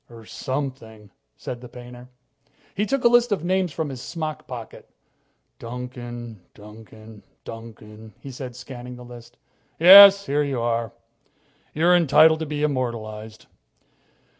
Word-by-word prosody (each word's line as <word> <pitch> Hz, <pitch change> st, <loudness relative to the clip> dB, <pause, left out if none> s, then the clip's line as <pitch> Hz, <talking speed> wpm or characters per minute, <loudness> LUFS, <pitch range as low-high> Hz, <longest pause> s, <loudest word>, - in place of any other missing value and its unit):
"Or 115 Hz, -2 st, -14 dB
something," 125 Hz, -6 st, -6 dB, 0.3 s
said 120 Hz, -1 st, -8 dB
the 125 Hz, -, -11 dB
painter. 125 Hz, 0 st, -13 dB, 0.6 s
He 210 Hz, +3 st, -2 dB
took 275 Hz, +1 st, -1 dB
a -, -, +6 dB
list 240 Hz, -1 st, +3 dB
of 190 Hz, -6 st, -1 dB
names 185 Hz, -1 st, 0 dB
from 155 Hz, 0 st, -4 dB
his 130 Hz, -3 st, -8 dB
smock 155 Hz, 0 st, -6 dB
pocket. 120 Hz, -3 st, -10 dB, 0.7 s
"Duncan, 120 Hz, -2 st, -8 dB
Duncan, 110 Hz, 0 st, -15 dB, 0.2 s
Duncan," 110 Hz, -2 st, -12 dB
he 140 Hz, -, -10 dB
said, 125 Hz, -1 st, -8 dB
scanning 125 Hz, 0 st, -10 dB
the 125 Hz, 0 st, -12 dB
list. 120 Hz, -1 st, -14 dB, 0.4 s
"Yes 200 Hz, +3 st, +9 dB
here 145 Hz, +2 st, 0 dB
you 140 Hz, -4 st, -2 dB
are. 115 Hz, -1 st, -2 dB, 0.8 s
You're 170 Hz, +3 st, +3 dB
entitled 160 Hz, -1 st, +4 dB
to 160 Hz, -, -4 dB
be 150 Hz, 0 st, -4 dB
immortalized. 110 Hz, -6 st, -4 dB
125 Hz, 135 wpm, -23 LUFS, 115-155 Hz, 0.8 s, Yes